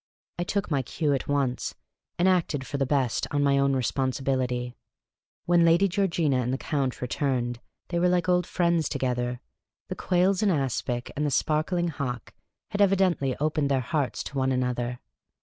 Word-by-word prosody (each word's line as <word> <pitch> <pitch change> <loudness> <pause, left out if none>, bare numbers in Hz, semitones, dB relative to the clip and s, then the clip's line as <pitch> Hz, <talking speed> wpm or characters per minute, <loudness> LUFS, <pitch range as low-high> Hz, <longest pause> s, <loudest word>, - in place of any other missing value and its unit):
I - - +1
took 195 0 -2
my 140 -2 +2
cue 145 +3 -1
at 135 - -2
once, 140 -3 -1 0.4
and 175 +2 +3
acted 165 -7 +1
for 145 - -4
the 135 - +1
best 135 -4 0
on 145 0 +1
my 140 -1 +3
own 140 0 +3
re 130 -1 0
sponsibility. 130 -1 -1 0.7
When 175 -1 +4
Lady 170 +4 +5
Georgina 170 -7 +1
and 125 0 0
the 130 - 0
Count 135 -4 -2
returned, 125 -2 -1 0.3
they 170 - 0
were 180 +1 +3
like 180 -1 +1
old 180 -1 +2
friends 170 -4 +1
together. 125 -1 -2 0.5
The - - -3
quails 185 +2 +2
in 210 - +3
aspic 130 - -1
and 150 - -1
the 150 - +1
spark 155 +4 0
ling 175 -1 +1
hock 140 -5 -5 0.4
had 205 -1 -1
evidently 185 -9 +2
opened 150 -1 0
their 135 -1 +2
hearts 145 0 -2
to 140 - -7
one 130 0 +1
another. 125 -1 -1
140 Hz, 180 wpm, -26 LUFS, 130-170 Hz, 0.7 s, Lady